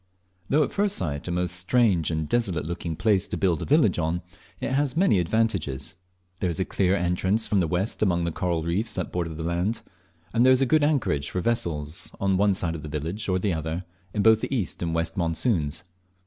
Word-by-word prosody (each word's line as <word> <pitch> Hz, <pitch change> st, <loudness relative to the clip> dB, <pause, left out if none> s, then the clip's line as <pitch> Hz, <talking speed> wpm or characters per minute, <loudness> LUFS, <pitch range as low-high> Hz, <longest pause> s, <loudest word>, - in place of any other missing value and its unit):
Though 150 Hz, +2 st, +4 dB
at -, -, -3 dB
first 205 Hz, 0 st, 0 dB
sight 75 Hz, -4 st, -3 dB
a -, -, -2 dB
most 90 Hz, 0 st, 0 dB
strange 90 Hz, -3 st, +2 dB
and 80 Hz, -2 st, -2 dB
desolate 95 Hz, -10 st, 0 dB
looking 85 Hz, 0 st, -4 dB
place 100 Hz, 0 st, +2 dB
to -, -, -3 dB
build 90 Hz, -5 st, +1 dB
a -, -, -3 dB
village 135 Hz, -, +3 dB
on, 85 Hz, +2 st, -1 dB, 0.4 s
it -, -, -3 dB
has 140 Hz, +2 st, 0 dB
many 170 Hz, -, +4 dB
advantages. 90 Hz, -8 st, 0 dB, 0.5 s
There 90 Hz, -, 0 dB
is 85 Hz, -, -3 dB
a 95 Hz, -, +1 dB
clear 95 Hz, 0 st, +1 dB
entrance 95 Hz, +4 st, +1 dB
from 100 Hz, -, +1 dB
the 85 Hz, -, +1 dB
west 90 Hz, +6 st, -1 dB
among 90 Hz, -5 st, +2 dB
the 85 Hz, -, -1 dB
coral 85 Hz, -1 st, -1 dB
reefs 95 Hz, +8 st, 0 dB
that 90 Hz, -, -3 dB
border 85 Hz, -3 st, -3 dB
the 80 Hz, -, -5 dB
land, 90 Hz, +7 st, -1 dB, 0.5 s
and 115 Hz, +1 st, +4 dB
there 130 Hz, +1 st, +7 dB
is 130 Hz, +1 st, +3 dB
good 150 Hz, +4 st, +3 dB
anchorage 125 Hz, -, +1 dB
for 90 Hz, -, -2 dB
vessels, 85 Hz, -8 st, -2 dB
on 95 Hz, -1 st, +2 dB
one 100 Hz, +1 st, +3 dB
side 85 Hz, -3 st, -1 dB
of 80 Hz, -, -6 dB
the 75 Hz, -, -7 dB
village 80 Hz, +8 st, -3 dB
or 95 Hz, -, +2 dB
the 95 Hz, 0 st, 0 dB
other, 80 Hz, +3 st, -3 dB, 0.3 s
in 105 Hz, -, 0 dB
both 110 Hz, 0 st, +6 dB
the -, -, -3 dB
east 115 Hz, -10 st, -2 dB
and 85 Hz, -1 st, -1 dB
west 80 Hz, +2 st, -2 dB
monsoons. 80 Hz, -, 0 dB
90 Hz, 220 wpm, -25 LUFS, 80-110 Hz, 0.5 s, there